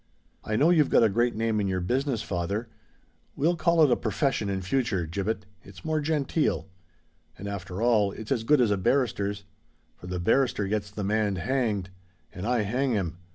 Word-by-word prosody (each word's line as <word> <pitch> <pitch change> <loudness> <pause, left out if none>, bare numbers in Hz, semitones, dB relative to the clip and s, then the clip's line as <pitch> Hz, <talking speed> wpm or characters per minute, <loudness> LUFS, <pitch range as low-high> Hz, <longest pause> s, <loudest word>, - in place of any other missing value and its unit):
"I 110 - -2
know 150 +9 +4
you've 155 -5 +4
got - - +5
a 110 - +5
great 120 +4 +1
name 110 -1 0
in 100 - 0
your 95 -1 -1
business, 125 +4 -1
father——" 100 +5 -3 0.7
"We'll 165 +5 +2
call 170 -1 +3
it 135 -5 +3
profession 135 -8 0
in 95 -1 -2
future, 100 -4 0
Gibbet; 100 +5 -3 0.2
it's 95 -1 -14
more 155 -1 0
genteel. 150 - 0 0.7
And, 100 - -7
after 100 0 -5
all, 110 -4 +3
it's 110 +4 -9
as 120 -5 +1
good 145 +3 +4
as 115 -4 +3
a 100 - +2
barrister's; 100 -2 0 0.5
for 90 - -12
the 90 0 -3
barrister 110 +1 +2
gets 105 0 -2
the 105 0 -5
man 105 0 +1
hanged—and 95 - -4
I 120 -3 +2
hang 125 +5 0
him. 90 -5 -2
105 Hz, 180 wpm, -27 LUFS, 95-130 Hz, 0.7 s, got